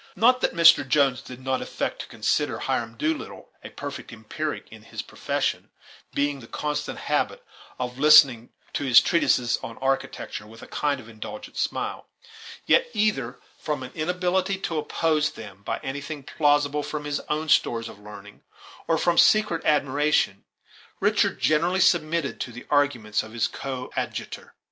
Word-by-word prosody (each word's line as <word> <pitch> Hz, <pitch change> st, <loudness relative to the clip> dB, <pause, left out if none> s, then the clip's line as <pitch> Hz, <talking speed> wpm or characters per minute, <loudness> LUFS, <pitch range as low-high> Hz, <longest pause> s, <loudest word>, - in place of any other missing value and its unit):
Not 255 Hz, +3 st, +4 dB
that -, -, 0 dB
Mr. 165 Hz, -4 st, +7 dB
Jones 135 Hz, -1 st, +2 dB
did 125 Hz, -2 st, -10 dB
not 130 Hz, 0 st, -1 dB
affect -, -, -3 dB
to -, -, -9 dB
consider -, -, 0 dB
Hiram 115 Hz, -1 st, -2 dB
Doolittle 155 Hz, +4 st, -3 dB
a -, -, -8 dB
perfect -, -, -7 dB
empiric 115 Hz, +8 st, -5 dB
in 110 Hz, -1 st, -12 dB
his 115 Hz, -, -7 dB
profession, -, -, -2 dB, 0.5 s
being 145 Hz, 0 st, +1 dB
in -, -, -13 dB
the 115 Hz, -, -12 dB
constant 150 Hz, +3 st, -3 dB
habit -, -, -1 dB, 0.3 s
of 125 Hz, 0 st, -4 dB
listening 135 Hz, -5 st, +6 dB, 0.2 s
to -, -, -2 dB
his 125 Hz, -3 st, +8 dB
treatises 125 Hz, -8 st, +2 dB
on 115 Hz, -, -8 dB
architecture 135 Hz, -5 st, -2 dB
with 115 Hz, +1 st, -13 dB
a -, -, -10 dB
kind 145 Hz, -2 st, -1 dB
of 115 Hz, -, -12 dB
indulgent 115 Hz, -, -9 dB
smile; -, -, -3 dB, 0.6 s
yet, -, -, +4 dB
either 135 Hz, -, 0 dB, 0.2 s
from 150 Hz, -4 st, -3 dB
an 130 Hz, -, -8 dB
inability 180 Hz, +4 st, 0 dB
to 165 Hz, -5 st, -2 dB
oppose 155 Hz, 0 st, +1 dB
them 100 Hz, -3 st, -11 dB
by -, -, -3 dB
anything 140 Hz, +2 st, -5 dB
plausible 145 Hz, 0 st, +2 dB
from 150 Hz, 0 st, -5 dB
his 145 Hz, -1 st, -1 dB
own 155 Hz, +1 st, -1 dB
stores 115 Hz, -6 st, +2 dB
of 105 Hz, -, -11 dB
learning 105 Hz, 0 st, -12 dB, 0.5 s
or 165 Hz, -, +2 dB
from 175 Hz, +1 st, +2 dB
secret 210 Hz, -6 st, +4 dB
admiration, 145 Hz, -7 st, +1 dB, 0.5 s
Richard -, -, +2 dB
generally 170 Hz, +5 st, +2 dB
submitted 170 Hz, -4 st, +2 dB
to 120 Hz, -, -4 dB
the 125 Hz, +1 st, -10 dB
arguments 125 Hz, -8 st, +1 dB
of 110 Hz, 0 st, -11 dB
his 120 Hz, -, +1 dB
co 130 Hz, -2 st, -6 dB
adjutor. -, -, -5 dB
145 Hz, 160 wpm, -25 LUFS, 120-155 Hz, 0.6 s, his